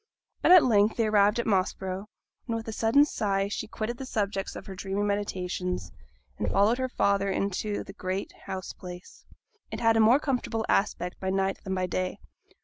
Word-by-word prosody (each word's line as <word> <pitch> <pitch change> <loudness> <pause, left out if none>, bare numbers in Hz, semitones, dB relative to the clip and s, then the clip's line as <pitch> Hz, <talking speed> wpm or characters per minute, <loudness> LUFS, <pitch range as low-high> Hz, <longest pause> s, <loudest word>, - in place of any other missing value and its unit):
But - - +4
at 365 -3 +9
length 215 -3 +3
they 230 - +2
arrived 210 0 +4
at 235 - -1
Moss 195 -3 +1
Brow, 190 +1 -5 0.4
and 230 - -1
with 225 0 -5
a - - -3
sudden 230 +7 +4
sigh 200 -7 0
she 205 +2 -4
quitted 225 +2 -4
the 265 - -6
subjects 200 -4 -2
of - - -8
her 195 - -7
dreamy 195 +2 -2
meditations, 185 -3 -2 0.5
and - - 0
followed 215 +5 +3
her 260 0 -1
father 200 -4 +1
into 200 +2 -1
the 195 - -11
great 190 0 -3 0.2
house 185 -1 -5
place. 180 0 -11 0.4
It - - -5
had 225 -1 +4
a - - +3
more 230 +5 +6
comfortable 245 -6 -1
aspect 180 -3 0
by 190 - -2
night 195 0 0
than 190 -1 -2
by 185 -1 0
day. 185 0 -2
200 Hz, 195 wpm, -28 LUFS, 190-225 Hz, 0.5 s, at